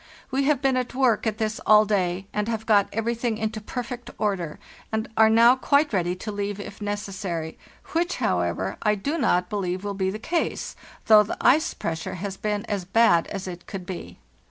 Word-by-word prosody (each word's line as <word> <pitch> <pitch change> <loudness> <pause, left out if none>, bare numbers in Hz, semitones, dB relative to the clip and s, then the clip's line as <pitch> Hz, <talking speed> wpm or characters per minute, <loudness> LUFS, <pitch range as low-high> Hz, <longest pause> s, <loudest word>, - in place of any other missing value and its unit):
We 270 +1 +1
have 285 -2 +2
been 265 -1 +3
at 250 -1 -3
work 250 -4 +2
at 215 -1 -1
this 220 -1 -2
all 215 0 +6
day, 190 -2 0
and 210 0 -1
have 220 -1 -3
got 205 -3 +4
everything 230 +1 -1
into 220 0 -3
perfect 245 +2 -6
order, 185 -7 -2 0.3
and 220 0 -1
are 220 0 +6
now 230 +3 +6
quite 285 +1 +2
ready 180 -2 +1
to 210 +4 -6
leave 205 0 -3
if 205 +1 -9
necessary, 195 -6 -4 0.4
which, 345 +2 +1
how 90 - +1
ever, 90 +3 -2
I 210 0 +2
do 285 +11 -2
not 180 -8 +2
believe 185 -2 -3
will 205 0 -3
be 190 -1 -1
the 200 - -4
case, 330 +10 -2 0.3
though 215 -1 +8
the 210 - -3
ice 310 +4 +3
pressure 160 +2 -4
has 195 +2 -5
been 210 +1 -2
as 200 -3 -2
bad 190 -3 +4
as 195 -2 -5
it 175 -1 -8
could 190 -3 -6
be. 180 -1 -7
210 Hz, 200 wpm, -25 LUFS, 190-230 Hz, 0.4 s, though